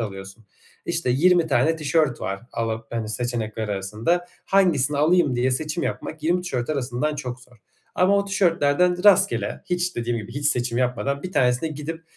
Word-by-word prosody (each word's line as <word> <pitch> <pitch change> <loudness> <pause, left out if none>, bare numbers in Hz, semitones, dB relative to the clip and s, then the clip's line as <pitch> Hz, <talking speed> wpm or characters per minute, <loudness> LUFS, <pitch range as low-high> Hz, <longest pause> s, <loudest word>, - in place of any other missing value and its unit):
alıyorsun. 95 0 -7 0.4
İşte, 125 - 0
20 170 +6 +4
tane 155 +3 +2
tişört 155 -4 0
var 95 +1 -3
ala 115 -1 -3
hani, 115 -2 -3
seçenekler 110 -1 -3
arasında. 105 - -1 0.2
Hangisini 160 -8 +2
alayım 155 -3 +3
diye 125 +2 +1
seçim 155 +5 -2
yapmak 155 -1 -4
20 175 +3 +1
tişört 130 -7 -3
arasından 140 +1 -1
çok 125 -3 -6
zor 125 -1 -19 0.4
ama 185 +2 +3
o 200 - 0
tişörtlerden 180 -2 +1
rastgele, 200 -1 +3
hiç 180 0 -1
dediğim 120 0 -1
gibi, 110 +1 -8
hiç 145 0 -1
seçim 120 -4 +1
yapmadan, 135 +3 -1
1 185 - -6
tanesine 125 +3 +2
gidip: 155 +2 -6
140 Hz, 165 wpm, -23 LUFS, 120-170 Hz, 0.4 s, 20